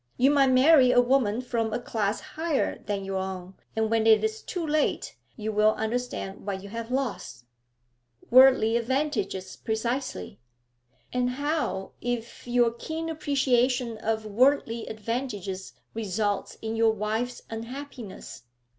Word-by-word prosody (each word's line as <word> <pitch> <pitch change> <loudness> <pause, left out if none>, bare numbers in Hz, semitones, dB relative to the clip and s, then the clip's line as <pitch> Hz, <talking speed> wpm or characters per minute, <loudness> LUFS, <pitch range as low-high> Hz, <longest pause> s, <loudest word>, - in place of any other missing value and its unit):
You 265 +3 +5
might 280 -2 +5
marry 260 +1 +6
a 245 - +5
woman 245 -3 +2
from 230 -3 -1
a 220 - -1
class 215 -3 -1
higher 320 -2 -2
than 200 -2 -3
your 195 0 -2
own, 190 -1 -5 0.2
and 220 0 0
when 225 -1 +2
it 220 -1 +6
is 440 0 -1
too 350 -3 -4
late 305 0 0 0.2
you 220 -1 -3
will 215 +1 +4
understand 220 -3 -3
what 195 -1 -4
you 200 - -9
have 230 +2 -5
lost.' 255 - -3 0.9
'Worldly 255 -3 +7
advantages, 235 -7 -1
precisely.' 225 - -3 0.7
'And 250 0 +1
how 285 -7 -2
if 240 0 -4
your 240 -1 +3
keen 320 +7 -5
appreciation 255 -6 +1
of 220 0 -1
worldly 235 +1 +2
advantages 210 -4 -4 0.2
results 205 -2 -2
in 220 0 -2
your 225 0 +4
wife's 220 +4 -2
unhappiness?' 230 - -8
230 Hz, 135 wpm, -27 LUFS, 215-260 Hz, 0.9 s, Worldly